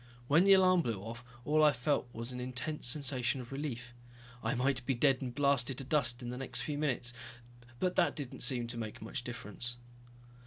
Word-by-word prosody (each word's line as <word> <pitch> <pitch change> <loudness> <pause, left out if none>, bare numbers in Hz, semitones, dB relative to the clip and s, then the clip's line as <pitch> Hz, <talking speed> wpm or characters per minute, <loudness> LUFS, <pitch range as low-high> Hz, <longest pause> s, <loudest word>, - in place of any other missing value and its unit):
When 160 +7 +5
the 195 - +8
alarm 185 -2 +5
blew 115 -9 -2
off, 115 +4 -8 0.2
all 155 +1 +3
I 150 - +7
felt 135 +1 0
was 115 +2 -5
an 125 - -6
intense 130 +4 -3
sensation 130 -2 +1
of 125 0 -9
relief. 125 -4 -5 0.5
I - - 0
might 130 +1 0
be 135 - +1
dead 135 +1 +3
and 130 -2 -3
blasted 140 -3 +2
to - - -3
dust 130 -3 +1
in 120 - -4
the 125 - -6
next 135 - -2
few 145 -1 -3
minutes, 125 -5 -1 0.7
but 185 -1 0
that - - +3
didn't 140 -4 -7
seem 125 -2 +4
to 120 -1 -5
make 110 -2 -6
much 110 +2 -5
difference. 120 0 -1
130 Hz, 200 wpm, -33 LUFS, 120-145 Hz, 0.7 s, the